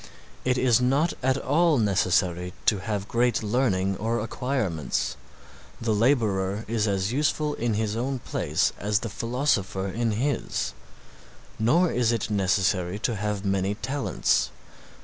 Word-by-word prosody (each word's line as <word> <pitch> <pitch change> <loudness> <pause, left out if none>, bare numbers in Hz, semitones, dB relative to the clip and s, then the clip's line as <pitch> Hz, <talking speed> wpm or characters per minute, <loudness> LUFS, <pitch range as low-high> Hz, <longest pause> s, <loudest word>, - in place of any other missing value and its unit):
It 125 0 +1
is 125 -2 +3
not 140 +7 +2
at 130 +1 +2
all 155 +4 +2
necessary 90 -4 +1
to 105 - +3
have 100 +1 -3
great 120 0 +1
learning 100 -4 +1
or 115 +3 -1
acquirements, 105 - -2 0.6
the 115 -2 0
laborer 105 -4 +1
is 110 -1 0
as 100 +1 0
useful 150 +1 +1
in 115 -4 -1
his 110 0 -1
own 130 +4 -1
place 120 - 0
as 105 +2 0
the 115 - -4
philosopher 115 -4 -1
in 110 +3 -1
his; 115 - -1 0.9
nor 160 +11 +3
is 120 -2 +2
it 115 -2 -2
necessary 95 -1 +1
to 115 +2 -1
have 105 -1 -3
many 95 +1 0
talents. 135 +5 0
110 Hz, 135 wpm, -26 LUFS, 100-125 Hz, 0.9 s, is